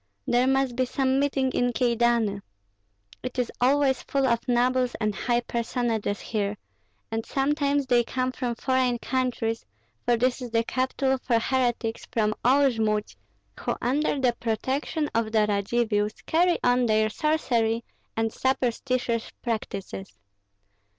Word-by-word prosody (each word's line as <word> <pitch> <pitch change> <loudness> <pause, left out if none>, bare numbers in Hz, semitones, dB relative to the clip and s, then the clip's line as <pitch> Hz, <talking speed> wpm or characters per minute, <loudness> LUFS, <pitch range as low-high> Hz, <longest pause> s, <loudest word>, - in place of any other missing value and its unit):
There 245 +2 +3
must 270 -2 +2
be 255 +1 +1
some 265 +1 +1
meeting 270 -2 +1
in 245 -1 +1
Kyedani. 235 -4 +2 0.8
It 255 0 -6
is 250 -2 0
always 265 0 +3
full 275 -1 0
of 235 -2 +2
nobles 250 0 +2
and 215 -2 0
high 240 +4 0
personages 235 -3 -1
here, 205 -2 -2 0.5
and 225 0 -1
sometimes 285 +1 +1
they 245 -2 +3
come 255 +2 -1
from 245 -2 -3
foreign 255 0 +1
countries, 240 -3 -1 0.4
for 240 -1 +2
this 250 +2 +1
is 245 - -5
the 230 0 +1
capital 260 +2 0
for 240 -2 +1
heretics 240 -2 -1
from 215 -2 +1
all 275 +3 +5
Jmud, 215 -2 -1 0.4
who - - -1
under 285 +3 0
the 250 -2 +2
protection 265 +7 -1
of 225 -1 0
the 215 -1 +3
Radzivills 210 +1 0
carry 345 +2 +3
on 245 0 +3
their 215 0 +3
sorcery 235 -4 0 0.3
and 225 -1 0
superstitious 250 -2 0
practices. 200 -4 -4
245 Hz, 135 wpm, -26 LUFS, 225-260 Hz, 0.8 s, all